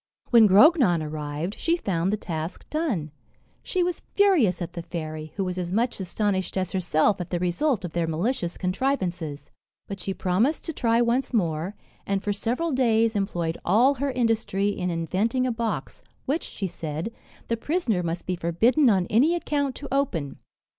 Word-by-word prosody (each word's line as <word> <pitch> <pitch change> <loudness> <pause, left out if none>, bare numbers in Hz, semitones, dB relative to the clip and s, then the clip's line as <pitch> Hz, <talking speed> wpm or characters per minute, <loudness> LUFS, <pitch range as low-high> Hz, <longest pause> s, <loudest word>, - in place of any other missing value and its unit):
When 230 -3 +8
Grognon 210 - +6
arrived, 150 +3 -4
she 335 +1 +1
found 185 - -1
the 215 - 0
task 165 -3 -5
done. 245 - -1 0.5
She 365 -2 0
was 355 0 -2
furious 340 - +4
at 175 -1 -5
the 170 - -5
fairy, 155 -2 -6
who 195 - -1
was 185 0 -3
as 175 -1 -3
much 235 +4 0
astonished 190 +1 -1
as 185 -1 -1
herself 185 +1 +1
at 175 - -6
the 175 - -1
result 180 - 0
of 175 - -5
their 170 -1 0
malicious 175 +2 -1
contrivances. 180 - -2 0.4
But 200 -1 -6
she 195 +1 -4
promised 215 - +1
to 325 - -4
try 235 -3 +2
once 245 +2 0
more; 170 -1 0 0.3
and 195 -1 0
for 205 - 0
several 245 +11 -1
days 230 -4 +2
employed 175 -5 -1
all 235 +10 +4
her 280 +1 -2
industry 225 -5 0
in 180 -3 -2
inventing 190 +9 0
a 255 - +1
box, 230 -1 -3 0.2
which, 290 +5 -1
she 200 - -5
said, 165 +3 -4 0.3
the 230 - +1
prisoner 230 - 0
must 170 0 -3
be 185 - -1
forbidden 225 - +3
on 190 -4 +3
any 270 - +3
account 285 -6 -1
to 285 - -7
open. 180 - -1
200 Hz, 175 wpm, -25 LUFS, 175-250 Hz, 0.5 s, When